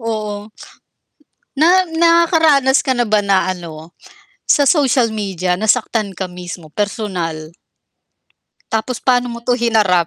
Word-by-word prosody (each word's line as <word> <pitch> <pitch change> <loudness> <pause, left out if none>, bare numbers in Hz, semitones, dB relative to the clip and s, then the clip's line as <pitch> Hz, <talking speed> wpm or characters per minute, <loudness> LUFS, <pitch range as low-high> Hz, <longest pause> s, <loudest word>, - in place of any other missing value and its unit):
oo, 215 -2 -4 1.1
na 355 +5 +3
nakaranas 325 -5 +3
ka 265 - -3
na 240 -2 +1
ba 210 -1 +2
na 195 -2 +1
ano, 165 -1 -11 0.5
sa 285 -1 +3
social 265 -7 +3
media 185 -4 -2
nasaktan 220 0 0
ka 190 0 -5
mismo, 175 -3 -10
personal? 175 -7 -4 1.2
Tapos 225 +2 -3
paano 245 -1 +2
mo 235 -1 -7
to 245 +1 0
hinarap? 210 -7 +2
220 Hz, 120 wpm, -17 LUFS, 185-260 Hz, 1.2 s, na